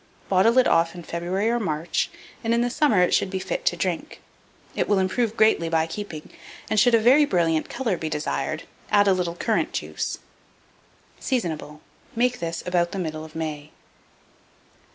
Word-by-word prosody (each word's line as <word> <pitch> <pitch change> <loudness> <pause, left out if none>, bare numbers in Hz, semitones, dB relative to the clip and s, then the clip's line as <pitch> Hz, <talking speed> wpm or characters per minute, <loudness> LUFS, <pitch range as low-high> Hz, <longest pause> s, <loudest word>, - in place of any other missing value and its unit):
Bottle 200 +6 +4
it 255 - +6
off 165 +1 +2
in 175 - -8
February 175 +6 -2
or 240 +1 +1
March, 165 -5 -1 0.3
and 230 0 +1
in 235 - +2
the 245 0 0
summer 230 -10 +3
it 180 - +1
should - - +2
be 190 - -3
fit - - -4
to - - +2
drink. - - -3 0.6
It - - -1
will 205 - +4
improve 215 +4 0
greatly 215 -6 +3
by 160 -1 +2
keeping; 165 -3 -7 0.4
and, 215 - +3
should 235 +3 +5
a - - +5
very 255 +7 +6
brilliant 165 - +1
colour 240 -7 -1
be 160 - -4
desired, 155 +1 -2 0.3
add 205 0 +4
a 195 - +5
little 175 -2 -2
currant - - 0
juice. - - -3 1.0
Seasonable. 160 - -3 0.3
Make 245 +1 +1
this 165 0 -4
about 175 -1 0
the - - -3
middle 155 -4 -4
of 160 0 -12
May. 155 -2 -4
185 Hz, 175 wpm, -24 LUFS, 165-225 Hz, 1.0 s, it